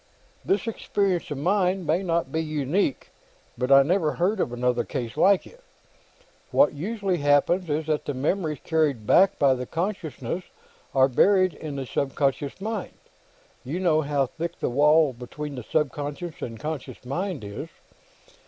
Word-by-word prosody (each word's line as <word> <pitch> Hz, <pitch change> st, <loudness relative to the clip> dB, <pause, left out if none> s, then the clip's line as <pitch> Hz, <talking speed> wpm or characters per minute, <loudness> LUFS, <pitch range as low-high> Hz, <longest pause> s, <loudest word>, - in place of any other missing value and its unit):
"This 190 Hz, +7 st, 0 dB
experience 200 Hz, -5 st, -1 dB
of 145 Hz, -, -4 dB
mine 185 Hz, +3 st, +1 dB
may 165 Hz, +4 st, +1 dB
not 170 Hz, -7 st, -1 dB
be 160 Hz, -, 0 dB
unique, 155 Hz, +1 st, -1 dB, 0.4 s
but 125 Hz, +2 st, -2 dB
I 135 Hz, 0 st, +8 dB
never 160 Hz, 0 st, +1 dB
heard 190 Hz, +4 st, 0 dB
of 125 Hz, -, 0 dB
another 120 Hz, 0 st, 0 dB
case 115 Hz, -1 st, -5 dB
like 195 Hz, -1 st, +4 dB
it. -, -, -16 dB, 0.9 s
What 280 Hz, -, +4 dB
usually 195 Hz, +4 st, -2 dB
happens 145 Hz, +5 st, +2 dB
is 150 Hz, +1 st, -1 dB
that 155 Hz, -1 st, -1 dB
the 145 Hz, -, -3 dB
memories 155 Hz, +3 st, -1 dB
carried 150 Hz, -9 st, +1 dB
back 190 Hz, -, +5 dB
by 140 Hz, -2 st, +4 dB
the 125 Hz, -1 st, -4 dB
consciousness 170 Hz, -, -3 dB, 0.5 s
are 130 Hz, 0 st, +6 dB
buried 185 Hz, +7 st, +4 dB
in 150 Hz, -3 st, -7 dB
the 135 Hz, -1 st, -4 dB
subconscious 140 Hz, +3 st, -1 dB
mind. 215 Hz, 0 st, -4 dB, 0.7 s
You 145 Hz, +8 st, -3 dB
know 165 Hz, -4 st, +3 dB
how 145 Hz, -2 st, +1 dB
thick 165 Hz, +6 st, -6 dB
the -, -, -1 dB
wall 150 Hz, +2 st, +4 dB
between 140 Hz, +5 st, -7 dB
the 125 Hz, -, -6 dB
subconscious 145 Hz, +4 st, -3 dB
and 115 Hz, -2 st, -5 dB
the -, -, -16 dB
conscious 150 Hz, -4 st, -5 dB
mind 170 Hz, -, -3 dB
is. 100 Hz, 0 st, -7 dB
155 Hz, 160 wpm, -25 LUFS, 135-180 Hz, 0.9 s, I